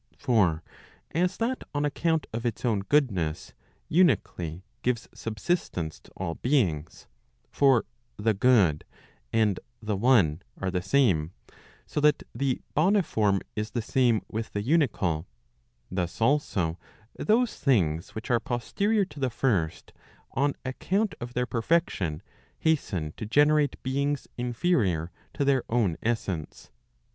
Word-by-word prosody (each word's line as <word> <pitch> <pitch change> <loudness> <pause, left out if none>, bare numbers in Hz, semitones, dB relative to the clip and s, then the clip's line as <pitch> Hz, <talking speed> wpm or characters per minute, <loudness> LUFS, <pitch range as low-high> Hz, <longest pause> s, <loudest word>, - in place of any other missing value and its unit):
For 95 -10 +2 0.5
as 180 +3 0
that 245 +3 -1
on 145 0 +1
account 160 +1 0
of 115 +1 -3
its 120 0 -2
own 110 -4 +2
goodness, 100 - 0 0.4
unically 95 - +2 0.2
gives 125 -2 -1
subsistence 110 - -2
to - - -20
all 90 -3 -2
beings; 85 - 0 0.5
for 135 -4 +4 0.3
the 110 +1 +2
good 100 -8 +4 0.5
and 110 -4 +2 0.2
the 105 -2 -2
one 95 - +3 0.2
are 95 -1 -2
the 90 -1 -1
same, 95 - +2 0.5
so - - -3
that 150 0 +3
the 135 -2 -1
boniform 150 - +2
is 105 +1 -2
the 120 +2 -2
same 120 -3 +2
with 110 +1 -5
the 105 - -2
unical; 105 - +1 0.7
thus 90 -2 -3
also 110 - +1 0.4
those 230 +2 +1
things 85 - +1
which 110 +4 -4
are 120 - +4
posterior 200 - 0
to 145 -4 -12
the 130 -2 +1
first, 100 -10 -1 0.4
on 140 +2 +1
account 195 +11 0
of 120 +1 -7
their 125 0 +1
perfection, 115 - 0 0.3
hasten 95 - 0
to 110 - -5
generate 145 +3 +3
beings 140 +2 -1
inferior 120 - 0 0.2
to 140 - 0
their 135 -2 +3
own 110 -8 +2
essence. 100 -9 -3
120 Hz, 130 wpm, -27 LUFS, 95-145 Hz, 0.7 s, for